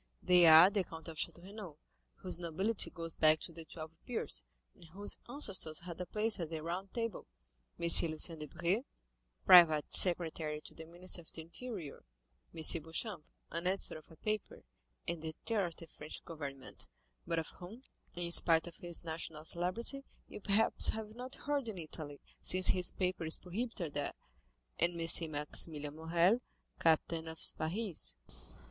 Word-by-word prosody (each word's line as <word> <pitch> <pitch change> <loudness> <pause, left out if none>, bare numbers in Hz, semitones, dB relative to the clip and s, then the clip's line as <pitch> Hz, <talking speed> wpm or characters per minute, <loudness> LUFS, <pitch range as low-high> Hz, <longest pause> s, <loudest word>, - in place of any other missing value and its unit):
They 180 -1 +5
are 160 +4 +9
the 200 -2 0
Count 165 -1 -10
of 160 - -8
Château 170 - -4
Renaud, 195 -5 -10 0.4
whose 180 -2 0
nobility 190 +6 +1
goes 165 -2 0
back 155 0 +4
to 170 - -8
the 165 0 -9
twelve 160 -1 -9 0.2
peers, 140 - -2 0.3
and - - -18
whose 195 +5 -2
ancestors 195 - +1
had 175 0 -7
a 180 - -6
place 215 0 -1
at 165 -3 -4
the 160 -1 -6
Round 180 +4 -5
Table; 230 -4 -4 0.5
M. 170 - -1 0.2
Lucien 155 +1 -1
Debray, 170 - -2 0.6
private 160 -4 +7
secretary 160 -4 +3
to - - -12
the 160 0 -11
minister 175 +1 -3
of 160 - -16
the 160 - -7
interior; 170 - -8 0.5
M. 160 - -6 0.2
Beauchamp, 165 +2 -4 0.3
an 170 +2 -3
editor 185 -4 -1
of 155 - -22
a 165 - -15
paper, 215 +4 -4 0.4
and 170 -2 -3
the 160 -1 -6
terror 210 -5 0
of 165 - -9
the 165 - -9
French 155 -1 -10
government, 140 -5 -7 0.4
but 165 - -2
of 160 - -3
whom, 215 +9 -11 0.3
in 175 -1 -4
spite 165 -1 +5
of 170 -1 -10
his 175 -1 -2
national 160 -1 -6
celebrity, 190 - +2 0.2
you - - -10
perhaps 205 +3 +4
have 215 -1 -2
not 250 +3 -8
heard 285 -3 -3
in 215 -4 -6
Italy, 155 -3 -4 0.2
since 185 0 +3
his 180 -1 +4
paper 185 -2 -3
is 160 0 +3
prohibited 180 - -5
there; 145 0 -3 0.7
and 170 0 0
M. 165 -1 +2
Maximilian 150 0 -1
Morrel, 170 +8 +1 0.4
captain 165 0 +1
of 160 0 -8
Spahis." 175 - +1
170 Hz, 165 wpm, -34 LUFS, 160-195 Hz, 0.7 s, are